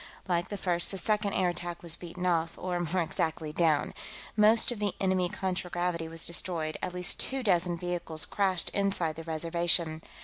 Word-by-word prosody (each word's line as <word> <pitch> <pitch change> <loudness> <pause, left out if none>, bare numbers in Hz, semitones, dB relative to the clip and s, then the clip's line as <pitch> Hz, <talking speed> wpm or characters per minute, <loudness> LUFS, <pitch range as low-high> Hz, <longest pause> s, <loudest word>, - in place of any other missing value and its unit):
Like 175 -1 +1
the 205 - -4
first, 175 -2 -1
the 195 - -5
second 210 0 0
air 185 -1 +2
attack 175 0 -5
was 170 -1 -2
beaten 180 +1 -7
off, 165 -2 +1
or, 180 -1 -2
more 175 +1 0
exactly, 160 -1 -2
down. 155 -3 +2 0.4
Most 220 +3 +5
of 235 - -4
the 205 -2 -1
enemy 185 -2 +1
contragravity 180 -3 -2
was 165 0 -1
destroyed; 170 -2 -1
at 180 - -3
least 180 +1 +2
two 265 -1 +2
dozen 175 -4 +2
vehicles 170 -2 -1
crashed 190 -3 +1
inside 195 -5 0
the 165 - -7
Reservation. 165 0 +1
175 Hz, 175 wpm, -29 LUFS, 165-190 Hz, 0.4 s, Most